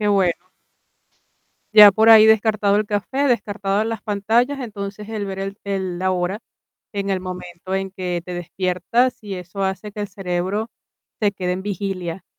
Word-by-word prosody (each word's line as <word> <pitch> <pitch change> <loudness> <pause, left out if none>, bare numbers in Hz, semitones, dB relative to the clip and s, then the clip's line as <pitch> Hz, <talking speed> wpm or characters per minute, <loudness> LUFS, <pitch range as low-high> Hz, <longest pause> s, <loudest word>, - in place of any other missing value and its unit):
Qué 210 - +1
bueno. 190 -4 +3 1.4
Ya 210 -2 +10
por 220 +2 +3
ahí 220 -1 +9
descartado 215 -2 +3
el 215 - +1
café, 215 +7 -1
descartadas 205 -2 0
las 225 -2 -4
pantallas, 225 +7 +1
entonces, 210 -3 -6
el 215 -2 -3
ver 195 -1 -5
el 195 +1 -4
el 190 -3 -3
la 185 0 +1
hora 185 +4 -1 0.5
en 200 -1 -2
el 190 - +1
momento 180 0 -7
en 195 0 -2
que 180 -2 -3
te 180 - -6
despiertas, 180 +8 0
y 205 -3 -6
eso 180 +2 -5
hace 190 +2 -3
que 210 - -7
el 205 - -4
cerebro 190 +4 -3 0.5
se 205 -2 +2
quede 185 -2 -2
en 185 +1 -4
vigilia 190 -3 -4
200 Hz, 170 wpm, -21 LUFS, 185-210 Hz, 1.4 s, Ya